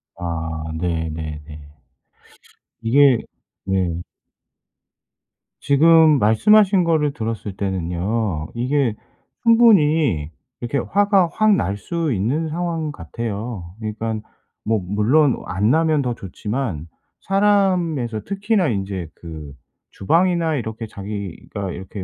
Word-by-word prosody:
아 80 -2 -4 0.2
네네네. 80 -3 -4 1.2
이게 130 +1 +5 0.5
네. 90 -3 -1 1.6
지금 155 +1 +5
말씀하신 190 - +4
거를 155 -4 +1
들었을 110 -6 -5
때는요 95 -1 -2
이게 125 -1 0 0.5
충분히 155 - +4 0.3
이렇게 120 +4 -2
화가 200 0 +2
확 215 -2 +4
날 100 - -1
수 165 - -2
있는 130 +11 -1
상황 165 -2 -2
같아요. 105 - -6
그러니깐 110 0 -4 0.4
뭐 110 -1 +1
물론 115 - +2
안 100 +4 0
나면 160 0 +2
더 125 -3 -1
좋지만 100 - -4 0.3
사람에서 185 - +1
특히나 200 -2 0
인제 95 -5 -3
그 80 -4 -9 0.4
주방이나 165 - +1
이렇게 110 -2 -5
자기가 100 -1 -6
이렇게 95 +2 -7
115 Hz, 210 characters per minute, -21 LUFS, 95-160 Hz, 1.6 s, 이게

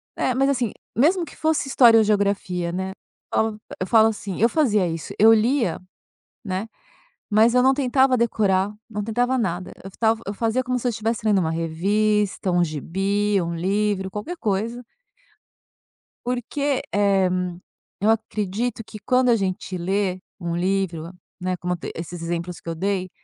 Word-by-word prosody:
É. - - 0
É, - - 0
mas 270 +2 +2
assim, 250 -6 0 0.2
mesmo 340 - +3
que 295 - -13
fosse 315 -3 0
história 240 -4 +6
ou 220 - +6
geografia, 200 -4 0
né, 190 +2 -3 0.4
falo 220 -1 0 0.2
eu 185 - -1
falo 220 +2 +6
assim 205 -4 -4
eu 230 - +5
fazia 215 - +2
isso, 165 -1 -5
eu 220 +2 +8
lia, 225 - +1 0.7
né, 190 +1 -3 0.6
mas 220 +3 +4
eu 250 - +5
não 265 +1 +5
tentava 265 -1 +3
decorar, 205 -4 +1 0.2
não 210 -2 -4
tentava 245 +4 0
nada, 185 -5 -2
eu 195 - -8
f - - -20
tava 225 0 +2
eu 200 - -2
fazia 230 +4 0
como 255 0 -1
se 250 - -4
eu - - +3
estivesse 225 0 -2
lendo 210 -2 +4
uma 160 -3 0
revista, 195 +5 0
um 175 0 +3
gibi, 195 +6 0
um 170 0 -3
livro, 195 +2 0
qualquer 250 - -5
coisa. 230 - -2 1.4
Porque, 265 +3 -1
eh, 200 -2 +3 0.7
eu 210 - +3
acredito 220 +1 -1
que 215 - -10
quando 250 +4 +2
a 235 - +5
gente 185 -2 -3
lê 185 +1 -1 0.2
um 170 -2 -3
livro, 180 -2 -1 0.3
né, 185 0 -1
como 180 +1 -2
te 175 - -7
esses 170 +1 -6
exemplos 170 +1 -4
que - - -8
eu 165 - -3
dei, 185 +1 -1
205 Hz, 170 wpm, -23 LUFS, 185-235 Hz, 1.4 s, eu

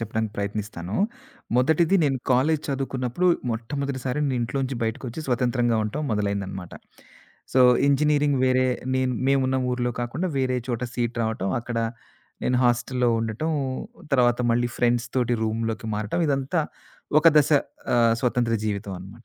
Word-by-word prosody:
చెప్పడానికి 110 -1 -2
ప్రయత్నిస్తాను. 100 -2 -4 0.6
మొదటిది, 160 +8 +3
నేను 135 -2 +1
కాలేజీ 145 +5 +3
చదువుకున్నప్పుడు 135 +3 -1 0.2
మొట్టమొదటిసారి 130 +3 -3
నేను 130 -2 0
ఇంట్లో 120 +4 -2
నుంచి 130 -1 -3
బయటకొచ్చి 120 +5 -4
స్వతంత్రంగా 120 -2 +1
ఉండటం 110 +9 -3
మొదలైందనమాట. 100 -3 -2 0.8
సో, 130 - +4 0.3
ఇంజినీరింగు 145 -1 +2
వేరే 130 0 +3 0.3
నేన్ 130 -1 +1 0.2
మేమున్న 130 -1 +2
ఊర్లో 125 0 0
కాకుండా 130 +10 -2
వేరే 130 -1 +1
చోట 120 0 -2
సీట్ 120 -1 -2
రావటం 110 -4 -2
అక్కడ 120 0 -4 0.7
నేను 125 - +2
హాస్టల్లో 120 +1 +1
ఉండటం, 115 +8 -2 0.6
తర్వాత 120 -2 +4
మళ్ళీ 120 +1 +2
ఫ్రెండ్స్‌తోటి 120 0 +1
రూమ్‌‌లోకి 110 0 -2
మారటం. 105 +10 -2
ఇదంతా 140 +4 0 0.6
ఒక 165 - +7
దశ 150 - +4 0.5
ఆహ్, 115 -1 +4
స్వతంత్ర 120 -2 +1
జీవితం 100 -1 -3
అనమాట. 100 +6 -12
120 Hz, 130 wpm, -24 LUFS, 115-135 Hz, 0.8 s, ఒక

